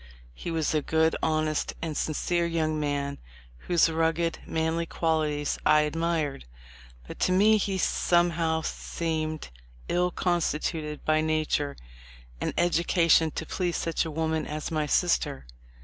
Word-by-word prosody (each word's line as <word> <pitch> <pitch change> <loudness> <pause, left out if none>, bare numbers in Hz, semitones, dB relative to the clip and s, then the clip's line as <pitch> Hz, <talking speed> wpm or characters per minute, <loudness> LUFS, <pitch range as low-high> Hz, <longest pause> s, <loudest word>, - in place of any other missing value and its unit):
He 115 - -6
was 160 -2 0
a 155 - +2
good, 160 +2 +2
honest, 155 -1 0
and 160 -2 -4
sincere 170 +3 0
young 155 -2 0
man 140 -1 -2 0.5
whose 175 -2 +4
rugged, 165 +1 0
manly 160 +1 -1
qualities 155 -3 0
I 150 0 +5
admired; 155 - -1 0.6
but - - -9
to - - +2
me 210 +4 +5
he 195 -2 -1
somehow 170 -3 +2
seemed 155 - -3 0.4
ill 180 +1 +1
constituted 160 -3 -1
by 155 0 +3
nature 155 -2 0 0.6
and - - 0
education 170 -1 +3
to 160 - -5
please 175 +1 -2
such 165 - 0
a 160 - -4
woman 160 0 -1
as 150 +1 -4
my 155 -2 0
sister. 145 - +1
160 Hz, 135 wpm, -27 LUFS, 155-170 Hz, 0.6 s, I